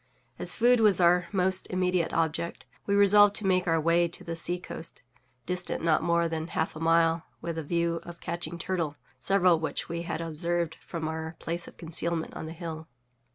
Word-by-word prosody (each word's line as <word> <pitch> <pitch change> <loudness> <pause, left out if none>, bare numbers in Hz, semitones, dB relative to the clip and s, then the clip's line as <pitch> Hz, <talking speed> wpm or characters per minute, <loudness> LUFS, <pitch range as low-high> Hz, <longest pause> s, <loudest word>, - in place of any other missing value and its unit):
As - - -2
food 245 +1 +4
was 210 -5 +4
our 180 0 +4
most 190 -1 +1
immediate 180 -2 0
object, 165 +1 -1 0.2
we 200 - +2
resolved 205 0 +6
to 215 - -2
make 185 -1 +2
our 165 -1 +3
way 170 +2 +3
to 170 - -7
the 170 - -4
seacoast, 175 0 -3 0.4
distant 180 -2 -1
not 160 -2 +3
more 170 0 +2
than 160 0 -3
half 160 -2 -2
a - - -7
mile, 165 0 +3
with 170 -1 -4
a - - -4
view 170 +2 0
of 175 0 -11
catching 170 -1 -4
turtle, 170 -4 -2 0.2
several 185 -3 +4
of - - -8
which 160 - -3
we 170 0 -3
had 170 -1 -4
observed 165 +1 -2
from 160 -2 -5
our 160 +1 -4
place 170 +1 -3
of - - -13
concealment 165 0 -2
on 160 - -6
the 160 - -6
hill. 160 -2 -7
170 Hz, 195 wpm, -28 LUFS, 165-180 Hz, 0.4 s, resolved